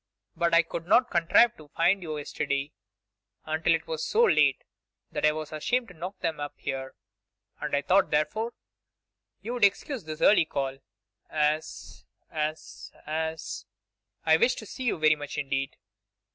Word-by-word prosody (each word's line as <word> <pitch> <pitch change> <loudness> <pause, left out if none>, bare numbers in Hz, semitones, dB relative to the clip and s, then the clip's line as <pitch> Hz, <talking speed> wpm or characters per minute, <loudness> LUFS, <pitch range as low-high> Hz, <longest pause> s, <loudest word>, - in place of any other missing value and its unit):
But 170 0 +2
I 170 - +6
could 165 0 -6
not 245 +5 +4
contrive 180 +7 +4
to 155 - -14
find 175 +6 +2
you 155 -3 -4
yesterday 145 -1 -2 0.7
until 160 +1 +2
it 160 - -5
was 160 -1 -4
so 460 +2 +3
late 465 - +4 0.5
that - - +2
I - - +4
was 155 0 -6
ashamed 235 +10 0
to - - -12
knock 180 +4 -7
them 160 -2 -1
up 145 0 -5
here, 130 -1 -5 0.6
and - - -1
I 140 - 0
thought, 190 +6 +3
therefore, 215 +10 0 0.9
you 235 +4 -4
would 245 -3 -2
excuse 200 - +2
this 155 0 -6
early 205 -5 +6
call, 135 -3 -3 0.5
as, 150 +1 -2 0.3
as, 155 0 -4
as, 160 +1 -4 0.6
I 160 0 +6
wished 250 - +3
to 220 - -7
see 255 +5 -7
you 240 - +1
very 155 -1 +4
much 145 -1 -7
indeed. 135 -1 -2
160 Hz, 160 wpm, -28 LUFS, 150-190 Hz, 0.9 s, I